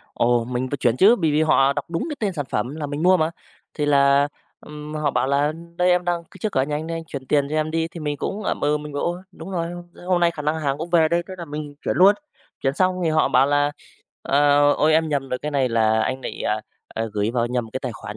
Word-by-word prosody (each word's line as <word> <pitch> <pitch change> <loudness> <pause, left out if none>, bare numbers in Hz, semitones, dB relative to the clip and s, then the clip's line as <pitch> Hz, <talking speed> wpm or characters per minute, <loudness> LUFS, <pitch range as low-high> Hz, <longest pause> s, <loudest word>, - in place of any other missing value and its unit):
Ồ, 120 0 +2
mình 125 +1 -3
phải 145 - -1
chuyển 125 -3 +1
chứ, 210 - +6
bởi 165 -7 +1
vì 150 +2 +3
họ 140 -3 +4
đọc 145 0 -3
đúng 165 - -2
cái 295 - -5
tên 205 -3 0
sản 150 -5 -3
phẩm 120 +7 -2
là 150 -2 -4
mình 145 +2 -4
mua 185 +1 +6
mà. 160 -1 +1 0.5
Thì 145 - 0
là, 140 0 +4 0.3
ừm, 150 0 -9
họ 150 -1 0
bảo 130 - 0
là 145 +2 +1 0.2
"Đây 180 +1 +3
em 180 0 +2
đang 175 -1 -1
c - - -32
trước 215 -2 -2
cửa 130 - +2
nhà 150 +2 -2
anh 155 +2 -5
đây, 165 0 -3
anh 165 - -6
chuyển 135 -4 -7
tiền 140 0 +2
cho - - -3
em 155 0 0
đi", 165 0 -1
thì 165 - -10
mình 150 -1 -2
cũng 200 +8 -4
ậm - - -2
ừ, 150 +1 +2
mình 150 0 -8
bảo: 145 - -2
"Ôi, 175 +1 -2
đúng 170 +1 -9
rồi, 170 -3 -2 0.3
thế - - -14
hôm 180 -1 +1
nay 170 -1 +4
khả 150 - -7
năng 155 +2 -1
hàng 140 -1 -1
cũng 170 +2 -5
về 165 -2 +4
đây", 170 +1 +1
thế 190 - -6
là 170 - -5
mình 150 -1 -6
chuyển - - -1
luôn. 195 +3 +7 0.5
Chuyển 135 +1 +1
xong 185 +1 +1
thì 160 - +2
họ 155 0 +3
bảo 130 +2 +4
là, 145 0 +2 0.5
ờ, 145 +1 +4
"Ôi, 155 +2 +2
em 160 0 +3
nhầm 140 -2 -1
rồi, 125 - -2
cái 150 - -4
này 135 -3 +1
là 110 -1 +2
anh 130 +3 -2
bị, - - -6
à, 105 +1 0 0.3
à, 115 - -1
gửi 105 +1 0
vào 120 -1 0
nhầm 120 -2 -3
cái 130 - -4
tài 125 - -3
khoản - - -8
150 Hz, 285 wpm, -22 LUFS, 135-165 Hz, 0.5 s, luôn